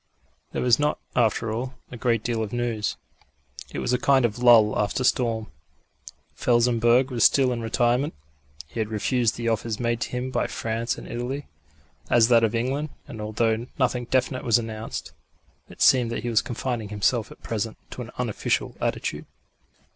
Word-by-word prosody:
There - - -2
was 125 0 +4
not, 150 0 +1 0.2
after 115 -1 +1
all, 125 +3 -4 0.2
a - - -7
great 115 -2 0
deal 115 -2 -1
of 105 -2 -3
news. 120 -3 -2 0.7
It - - -7
was - - -1
a 125 - +2
kind 135 -3 +4
of 115 0 -2
lull 115 -3 +6
after 105 +5 0
storm. 115 -4 +1 0.8
Felsenburgh 120 +1 +3
was 120 -2 +1
still 135 -2 +5
in 120 - -4
retirement; 120 - +1 0.5
he 75 +9 -8
had 110 -1 -1
refused 115 +2 +1
the 115 0 -4
offers 115 -1 -1
made 120 -1 -1
to - - -2
him 125 +1 -3
by 120 - 0
France 115 +2 -2
and - - -9
Italy, 125 +4 -4 0.6
as 120 -1 +5
that 115 -1 +5
of 110 +1 +1
England; 135 +6 -1 0.2
and, 110 - -8
although 110 +2 0
nothing 125 -2 0
definite 130 +2 0
was 115 0 +4
announced, 115 -1 -5 0.6
it - - -2
seemed 125 -3 +5
that 115 - -3
he 120 - -2
was 110 -2 +3
confining 120 -3 -4
himself 105 +2 0
at - - -15
present 110 0 -3
to - - -6
an 120 - -7
unofficial 120 -4 -1
attitude. - - -2
120 Hz, 175 wpm, -25 LUFS, 110-125 Hz, 0.8 s, lull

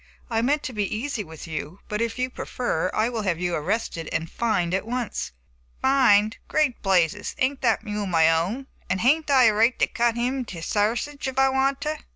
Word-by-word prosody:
I 225 0 +2
meant 290 +5 +1
to 255 - -5
be 210 -1 -1
easy 240 -2 -3
with 160 -3 -10
you, 160 +2 -6
but, 210 +1 -2
if 230 0 -2
you 255 0 -1
prefer, 185 -11 -2
I 215 - +1
will 235 -2 -2
have 185 -5 -1
you 180 -1 -1
arrested 165 0 -2
and 165 +1 -2
fined 180 -7 0
at 190 +3 -1
once." 245 -1 -3 0.5
"Fined! 225 -6 +4
great 300 -6 +1
blazes, 190 +1 +1
ain't 265 +1 0
that - - +2
mule 210 -2 -3
my 165 -3 +4
own, 185 +12 -1 0.2
and 185 - 0
hain't 295 +6 +3
I 265 -2 +6
a 220 -3 +6
right 225 +4 +3
to - - +3
cut 235 -1 0
him 250 +3 -1
into 190 -10 -6
sarsage 235 +9 -1
if 265 0 -5
I 270 0 +5
want 270 +1 +1
to?" 305 +1 -2
225 Hz, 205 wpm, -24 LUFS, 190-260 Hz, 0.5 s, I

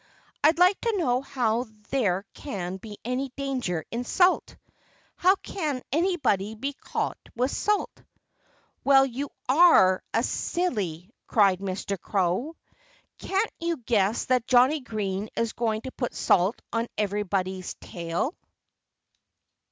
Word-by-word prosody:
"I'd 310 +2 +5
like 365 +3 +4
to 460 -3 0
know 255 -8 +1
how 245 -3 0 0.3
there 200 -8 +1
can 190 -8 -5
be 205 +1 -10
any 255 +3 -1
danger 255 - -2
in 235 +1 -2
salt. 360 +8 +2 0.6
How 370 +2 +4
can 305 -10 -4
anybody 275 - +1
be 275 +6 -3
caught - - -3 0.2
with 250 +3 +1
salt?" 420 0 -1 0.8
"Well, 270 -1 +6
you 270 +2 -4 0.2
are 260 - +6
a 230 - +1
silly!" 205 - -2 0.2
cried 195 -4 +4
Mr. 195 0 -3
Crow. 195 - 0 0.6
"Can't 390 +3 0
you 335 0 -1
guess 220 -4 +1
that 250 -2 +1
Johnnie 255 +5 +5
Green 210 -3 -3
is 230 -1 -1
going 220 -2 -1
to 260 - -7
put 245 -2 -4
salt 185 +5 +2
on 230 +1 0
everybody's 195 -3 -2
tail?" 170 - -3
240 Hz, 125 wpm, -26 LUFS, 195-280 Hz, 0.8 s, Well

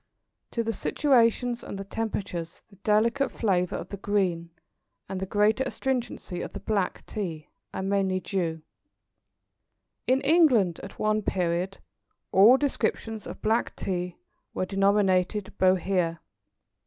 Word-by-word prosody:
To 230 - -1
the 225 0 -1
situations 240 -1 +2
and - - -6
the 195 - -5
temperatures 195 -5 -4
the 200 - -18
delicate 230 +7 +2
flavour 180 -5 0
of - - -6
the 200 - -6
green 185 -4 0 0.6
and 190 - -4
the 190 - -3
greater 210 +5 +2
astringency 245 -10 -3
of - - -6
the - - -5
black 200 -4 -1
Tea, 165 -8 -5 0.2
are 190 - -4
mainly 195 -1 +1
due. 170 -5 -2 1.4
In 260 +1 +4
England, 270 - +4
at 195 - -10
one 215 0 +1
period, 180 0 -1 0.5
all 215 +7 +7
descriptions 225 -5 -2
of - - -9
black 225 +2 +1
Tea 180 -2 -3 0.4
were - - 0
denominated 195 0 +2
Bohea. 185 -2 +2
200 Hz, 130 wpm, -27 LUFS, 185-225 Hz, 1.4 s, all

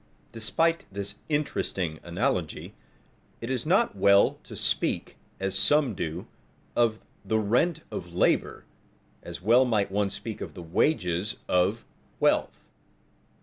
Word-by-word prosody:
Despite 165 +9 0
this 100 +1 -4 0.2
interesting 95 - -1
analogy, 90 - -2 0.7
it 115 +3 -4
is 130 +2 -1
not 210 +7 +3
well 100 0 +4
to - - -9
speak, - - 0 0.2
as 95 0 -2
some 145 +2 +3
do, 85 -1 -4 0.5
of 115 -2 +1 0.2
"the 110 - 0
rent 120 +11 +1
of 90 -1 -6
labor" 90 - +1 0.6
as 85 - -8
well 120 +5 +6
might 105 -6 +1
one 100 0 +1
speak 100 +2 -6
of - - -6
the 90 - -8
wages 90 - 0
of 95 +5 +1 0.3
wealth. - - +1
105 Hz, 125 wpm, -27 LUFS, 90-125 Hz, 0.7 s, well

